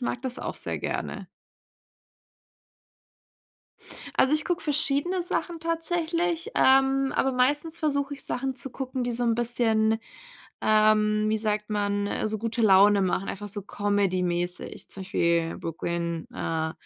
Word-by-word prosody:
mag 245 -1 -2
das 255 -1 -1
auch - - -5
sehr - - -3
gerne. - - -4 2.9
Also, 265 - +4
ich 305 0 +1
gucke 355 0 -1
verschiedene 305 +4 +1
Sachen 340 -1 -3
tatsächlich, 335 +2 -1
ähm, 270 0 +4
aber 270 - +1
meistens 290 +6 +1
versuche 285 -2 -1
ich 280 - -8
Sachen 265 0 -2
zu 260 +2 -5
gucken, 260 0 -4
die 245 - -1
so 240 +1 -2
'n 230 -1 +2
bisschen, 225 -2 +2 0.6
ähm, 215 0 +3
wie 220 - +2
sagt 210 -1 -1
man, 205 -1 0
äh, 215 - -1
so 215 0 -3
gute 230 +2 -2
Laune 200 0 +6
machen, 185 +1 -1
einfach 205 +1 -5
so 205 +1 -5
comedy-mäßig. 185 -4 -1
Zum 195 - -9
Beispiel 170 -3 0
Brooklyn, 170 0 -3
äh 160 -1 -2
230 Hz, 140 wpm, -26 LUFS, 205-280 Hz, 2.9 s, Laune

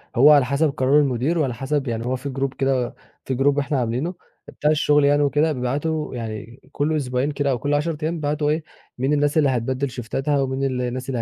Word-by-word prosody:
هو 140 +5 +7
على 140 -3 +6
حسب 140 +4 +1
قرار 135 +2 +3
المدير، 140 +4 +1
وعلى 135 -5 0
حسب 135 +2 -2
يعني 115 0 -3
هو 130 +1 0
في 140 +2 -5
Group 135 -1 -1
كده 135 -2 0 0.3
في 130 -2 -2
Group 140 +1 +3
إحنا 140 -1 -1
عاملينه 125 +9 -1 0.3
بتاع 150 +1 0
الشغل 150 -1 +3
يعني 145 +1 +4
وكده، 145 +3 +2
بيبعتوا 145 +3 -2
يعني 115 +1 -6
كل 155 +2 0
أسبوعين 130 +1 -1
كده، 140 -1 0
أو 125 - -1
كل 145 +2 -1
10 150 +2 0
أيام 165 +2 -1
بيبعتوا 150 -1 -1
إيه، 155 +1 0 0.3
مين 135 +4 0
الناس 145 +1 +1
اللي 145 -3 +4
هتبدل 130 +2 -1
شيفتاتها 135 +4 -1
ومين 135 0 -2
الناس 125 -1 -2
اللي 120 -3 -1
140 Hz, 210 wpm, -22 LUFS, 125-150 Hz, 0.3 s, هو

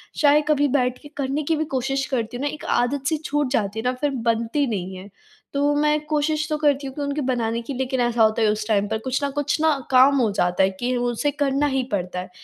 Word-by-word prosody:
चाहे 295 0 +4
कभी 290 -1 +3
बैठके 250 +2 -2
करने 280 +2 -1
की 320 +3 +1
भी 315 +1 -1
कोशिश 270 +1 0
करती 245 -3 -2
हूँ 260 - -5
ना, - - +1
एक 305 - -9
आदत-सी 275 +5 0
छूट 290 -2 0
जाती 210 -4 -1
है - - -4
ना 250 - +2
फिर 290 - +2 0.2
बनती 230 +5 0
नहीं 190 -4 -4
है। 185 +2 -10 0.4
तो 285 +1 +2
मैं 300 +1 +2
कोशिश 305 0 0
तो 305 - 0
करती 285 -2 +1
हूँ 265 - -7
कि 295 - -5
उनके 285 +1 -2
बनाने 235 -3 -1
की 235 +4 -6
लेकिन 260 0 -2
ऐसा 240 -1 +2
होता 220 +1 +2
है 220 - +4
उस 210 0 -2
टाइम 205 -2 +1
पर 220 +1 -1
कुछ 260 +2 -1
न 280 - +1
कुछ 290 +2 -1
ना 315 -2 +3
काम 265 +2 +6
हो 220 -3 +2
जाता 180 -2 +1
है 190 - +4
कि 250 +1 0
उसे 245 +4 0
करना 285 0 0
ही 265 -2 0
पड़ता 180 -2 -2
है। 180 - -7
265 Hz, 245 wpm, -23 LUFS, 230-290 Hz, 0.4 s, काम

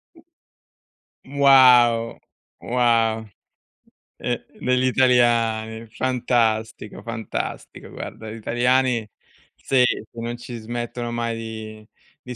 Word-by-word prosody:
U 325 - -20 1.0
Wow, 125 -4 +5 0.4
wow. 115 -2 +1 0.9
Eh, - - -3 0.2
degli 125 0 +1
italiani. 115 -3 +2
Fantastico, 115 -4 -1
fantastico. 115 -1 -6
Guarda, 110 -1 -8
gli - - -7
italiani 120 +1 +1 0.5
sì, 130 -2 +1 0.3
non 120 +1 -5
ci 120 0 -8
smettono 120 +1 -5
mai 115 -1 -2
di 110 -1 -8 0.4
di 125 - -6
120 Hz, 85 wpm, -22 LUFS, 110-125 Hz, 1.0 s, Wow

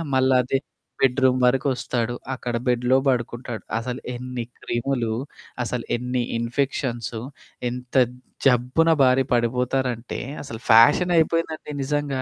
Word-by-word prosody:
మళ్లదే 130 0 +3 0.4
bedroom 130 -1 +3
వరకు 130 +3 +2
వస్తాడు 120 -1 -2 0.2
అక్కడ 120 -2 -4
బెడ్‌లో 125 +1 +3
పడుకుంటాడు. 120 -1 -2
అసలు 125 +2 -4
ఎన్ని 125 0 -5 0.2
క్రిములు? 120 -2 -1 0.5
అసలు 120 0 -3
ఎన్ని 125 0 -1
ఇన్ఫెక్షన్సు? 120 -1 -2 0.5
ఎంత 125 +1 -8 0.5
జబ్బున 130 +6 +3
బారి 130 0 +5
పడిపోతారంటే 125 0 0 0.2
అసలు 115 -5 -7
ఫ్యాషనయిపోయిందండి 160 +6 +4
నిజంగా. 145 -1 -1
125 Hz, 100 wpm, -23 LUFS, 120-135 Hz, 0.5 s, బారి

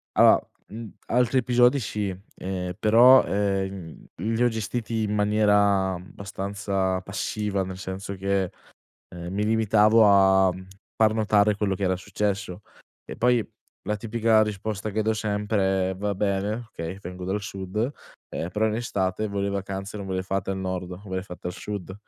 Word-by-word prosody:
Allora, - - +6 0.2
mhmm, 110 +1 -8 0.2
altri 125 +2 +2
episodi 125 +2 +4
sì. 105 -3 -3 0.2
Ehm, 90 -1 -4
però, 120 +4 +7
ehm, 95 -4 -2
li 115 +6 -1
ho 120 - +5
gestiti 110 0 -3
in 105 0 -1
maniera 105 -2 +3
abbastanza 95 0 -3
passiva, 100 0 -2
nel 95 0 -7
senso 100 0 -5
che, 95 -1 0 0.6
ehm, 85 +1 -6
mi 105 +2 0
limitavo 110 0 +4
a, 95 -2 +5
mhmm, 95 +1 -10 0.3
far 110 -1 +4
notare 105 -1 +3
quello 100 -2 0
che 100 - -6
era 95 0 +1
successo. 100 -1 -3 0.4
E - - -8
poi 120 -1 +2 0.4
la 105 +2 -1
tipica 110 0 +2
risposta 105 0 -3
che 110 +2 0
do 110 +1 +1
sempre 105 -3 0
è: 95 - -5
"Va 100 +1 -2
bene. 105 +4 -1
Okay, 85 +4 -6
vengo 90 0 -7
dal 100 +3 -1
sud. 100 +6 -3 0.4
Eh, 85 - -4
però 110 +3 +1
in 110 - 0
estate 100 -3 -1
voi 100 -1 -2
le 100 - 0
vacanze 100 +1 -4
non 100 - -6
ve 95 - -3
le 95 - -1
fate 95 0 -2
al 95 - -2
nord, 90 -1 -4
ve 95 - -3
le 95 - -2
fate 90 -2 -7
al - - -5
sud." 95 -1 -6
100 Hz, 170 wpm, -25 LUFS, 95-110 Hz, 0.6 s, però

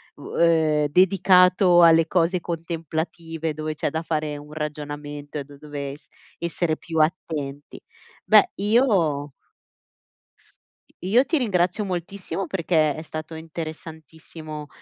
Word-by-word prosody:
uhm - - -7
ehm, 160 -3 +3
dedicato 180 +1 +5
alle 165 -1 +6
cose 175 +1 +1
contemplative, 165 -1 -4
dove 155 +1 -4
c'è - - -1
da 160 +1 -3
fare 155 -2 -2
un 150 +1 -12
ragionamento 145 -1 -6
e - - -4
da 140 0 -15
dove 145 -2 -6 0.4
essere 170 -1 -1
più 160 -1 -4
attenti. 155 -3 -2 0.5
Beh, 370 - +5
io 195 - +2 1.7
io 235 +8 +3
ti 325 - +1
ringrazio 185 -4 +1
moltissimo, 185 +1 -4
perché 160 -5 +1
è 155 - -6
stato 155 0 -7
interessantissimo 160 -1 -8
160 Hz, 115 wpm, -23 LUFS, 150-175 Hz, 1.7 s, alle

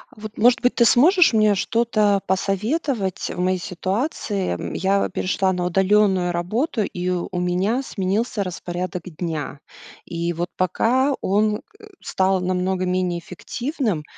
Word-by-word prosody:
Вот, 215 0 -9
может 240 +2 +5
быть, 250 - +2
ты 240 - +4
сможешь 335 - +5
мне 215 -2 +4
что-то 215 -1 +2
посоветовать 195 - -1
в - - -7
моей 185 +1 +1
ситуации? 195 - -2
М, - - -5
я 195 +1 +1
перешла 190 0 0
на 180 -1 -2
удалённую 190 0 +2
работу, 220 - -1
и 180 -2 -4
у 180 0 -2
меня 185 +8 0
сменился 205 -1 -1
распорядок 180 -1 -5
дня. 160 -4 -5 0.5
И 170 0 -3
вот 175 +1 -3
пока 245 - +2
он, 210 +2 +1 0.2
э, 430 - -13
стал 190 0 +1
намного 185 +1 -1
менее 180 -1 0
эффективным, 220 - -3
190 Hz, 135 wpm, -22 LUFS, 180-220 Hz, 0.5 s, может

